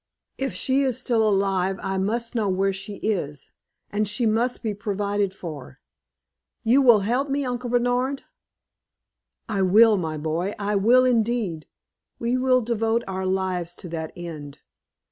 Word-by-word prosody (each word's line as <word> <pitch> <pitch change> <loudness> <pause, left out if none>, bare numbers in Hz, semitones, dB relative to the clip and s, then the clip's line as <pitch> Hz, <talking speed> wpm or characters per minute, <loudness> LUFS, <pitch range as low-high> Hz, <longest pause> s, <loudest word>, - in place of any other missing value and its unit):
If 270 0 -2
she 265 +1 +1
is 260 -3 0
still 225 -4 +2
alive, 195 -1 +1
I 190 -1 -1
must 230 +4 -1
know 220 -4 0
where 195 +1 +1
she 195 +2 -6
is, 150 -10 -3 0.4
and 210 +1 0
she 210 +4 0
must 230 +4 0
be 220 -2 -1
provided 205 -1 -1
for. 150 -7 -9 0.8
You 250 +4 +4
will 240 -6 +6
help 250 +8 0
me, 280 0 0
Uncle 245 -1 -3
Bernard?" 245 +3 0 1.2
"I 205 -3 -1
will, 210 +3 +6
my 160 -4 -3
boy 160 +6 -2
I 205 0 -1
will, 240 +6 +5
indeed. 225 -9 0 0.5
We 235 +1 -1
will 255 0 +3
devote 225 0 0
our 190 0 -3
lives 185 -2 -2
to 180 - -9
that 160 -1 -5
end. 155 -5 -8
210 Hz, 150 wpm, -24 LUFS, 190-240 Hz, 1.2 s, will